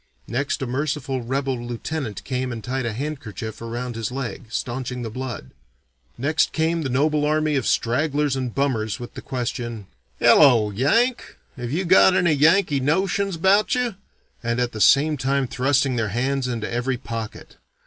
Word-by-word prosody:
Next 135 +4 -2
a - - -1
merciful 135 0 -2
rebel 130 0 -2
lieutenant 120 -1 -4
came 130 -1 -2
and 115 -2 -6
tied 130 -1 -2
a - - -1
handkerchief 115 -4 -6
around 120 +1 -4
his 115 0 -3
leg, 130 -2 -5
stanching 125 +1 -4
the 115 - -5
blood. 120 - -6 0.7
Next 155 +5 +1
came 165 +1 +1
the 140 - -2
noble 150 +4 +1
army 155 0 +1
of 135 - 0
stragglers 145 +3 +1
and 130 -3 -3
bummers 115 -7 0
with 120 0 -8
the - - -8
question, 120 -3 -4 0.3
'Hello, 115 - +6
Yank, 230 - +1 0.2
have 120 -1 -5
you 180 +6 -1
got 185 +1 +6
any 175 -4 +3
Yankee 155 0 +4
notions 190 +7 0
about 195 +8 +3
you?' 250 -3 0 0.5
and 120 0 -1
at 120 -1 0
the 110 - -5
same 150 +5 +5
time 135 +1 0
thrusting 135 0 +1
their 110 -2 0
hands 130 +4 -1
into 120 -3 -3
every 125 +2 -1
pocket. 115 -3 -7
130 Hz, 165 wpm, -23 LUFS, 120-150 Hz, 0.7 s, Hello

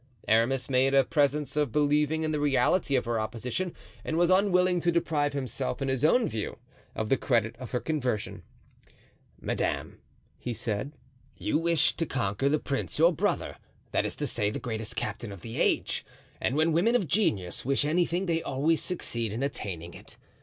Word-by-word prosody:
Aramis 115 +4 +2
made 135 +1 +3
a 135 - +6
presence 145 +1 +1
of 150 -5 +1
believing 150 +2 +2
in 155 - 0
the 150 - -1
reality 145 +2 +2
of 130 - +1
her 115 -1 0
opposition 120 +11 -3 0.3
and 160 - -2
was 175 +1 +3
unwilling 185 -2 +3
to 175 0 +2
deprive 150 -4 0
himself 130 - -3
in 135 - -1
his 130 0 -1
own 225 +9 +4
view 110 -2 -4 0.4
of 110 -1 -2
the 135 - +4
credit 115 -4 +1
of 130 - -7
her 125 - -1
conversion. 130 -9 -2 1.0
"Madame," - - -2 0.4
he 120 - -3
said, 115 +4 -3 0.4
"you - - 0
have 165 - -3
wished 165 -3 +2
to 165 - 0
conquer 120 +1 0
the 150 - +3
prince 140 -2 -3
your 170 +3 +5
brother—that - - -2
is - - -4
to - - -3
say, 105 - +1
the - - -4
greatest 110 -3 -5
captain 115 - -4
of 100 -3 -10
the 115 0 -6
age; - - +1 0.4
and 130 - 0
when 160 +2 +3
women 210 +9 +3
of 200 -8 +1
genius 100 - +1
wish 140 +2 +1
anything 175 +4 +1
they 165 -2 0
always 155 +4 +1
succeed 115 - -2
in 115 +5 -3
attaining 85 - -4
it. - - -13
140 Hz, 180 wpm, -28 LUFS, 115-160 Hz, 1.0 s, a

